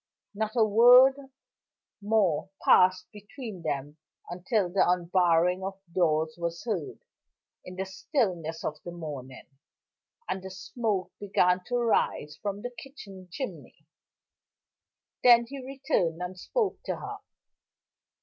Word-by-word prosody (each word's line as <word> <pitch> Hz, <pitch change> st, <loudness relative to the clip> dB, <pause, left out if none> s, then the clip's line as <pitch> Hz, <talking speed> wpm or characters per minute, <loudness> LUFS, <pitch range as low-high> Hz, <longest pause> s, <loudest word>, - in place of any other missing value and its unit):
Not 215 Hz, +1 st, -3 dB
a 225 Hz, -2 st, +4 dB
word 250 Hz, +5 st, +6 dB, 0.7 s
more 200 Hz, -6 st, +1 dB, 0.2 s
passed 185 Hz, 0 st, +5 dB
between 210 Hz, -1 st, -9 dB
them 145 Hz, -1 st, -4 dB, 0.3 s
until 185 Hz, +3 st, 0 dB
the 185 Hz, +3 st, +2 dB
unbarring 180 Hz, 0 st, +2 dB
of 195 Hz, 0 st, -5 dB
doors 160 Hz, -3 st, +1 dB
was 170 Hz, 0 st, -4 dB
heard 205 Hz, -10 st, -4 dB, 0.6 s
in 180 Hz, -, -10 dB
the 190 Hz, +1 st, -3 dB
stillness 185 Hz, -, -2 dB
of 150 Hz, 0 st, -4 dB
the -, -, -7 dB
morning, 145 Hz, -6 st, -8 dB, 0.8 s
and 190 Hz, -, -3 dB
the 190 Hz, -, -8 dB
smoke 195 Hz, +1 st, -3 dB
began 185 Hz, -2 st, +2 dB
to 245 Hz, -, -2 dB
rise 220 Hz, -10 st, 0 dB
from 205 Hz, -1 st, -4 dB
the 245 Hz, -, -4 dB
kitchen 200 Hz, -10 st, -12 dB
chimney. 265 Hz, +7 st, -7 dB, 1.4 s
Then 235 Hz, -1 st, +7 dB
he 270 Hz, +2 st, -8 dB
returned, 260 Hz, -11 st, -1 dB
and 180 Hz, +1 st, -5 dB
spoke 420 Hz, -, -2 dB
to -, -, -2 dB
her. -, -, -7 dB
190 Hz, 120 wpm, -28 LUFS, 175-230 Hz, 1.4 s, Then